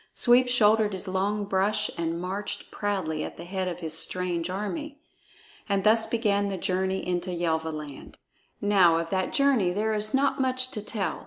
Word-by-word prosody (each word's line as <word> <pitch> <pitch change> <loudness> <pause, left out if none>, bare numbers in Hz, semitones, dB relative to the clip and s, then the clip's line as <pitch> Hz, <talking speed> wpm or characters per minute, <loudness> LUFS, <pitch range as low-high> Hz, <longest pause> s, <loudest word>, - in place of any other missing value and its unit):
Sweep 245 +1 +5
shouldered 220 -3 +3
his 190 +1 -2
long 200 +2 -1
brush 205 +2 0
and 165 0 -2
marched 190 +3 -5
proudly 185 -7 -2
at - - -7
the 170 - -8
head 185 +1 -3
of 180 0 -5
his 160 -1 -3
strange 175 +1 -1
army. 275 - -4 0.7
And 200 -1 +1
thus 220 +2 +4
began 205 -3 +1
the 195 -1 -3
journey 190 +1 -1
into 180 0 -2
Yelvaland. 160 -4 -3 0.4
Now 190 -5 +4
of 165 0 -3
that 185 -1 0
journey 275 -10 +3
there 215 +4 -1
is 215 0 +1
not 275 0 +1
much 255 0 0
to 215 - -5
tell. 205 -2 -3
195 Hz, 170 wpm, -26 LUFS, 180-215 Hz, 0.7 s, Sweep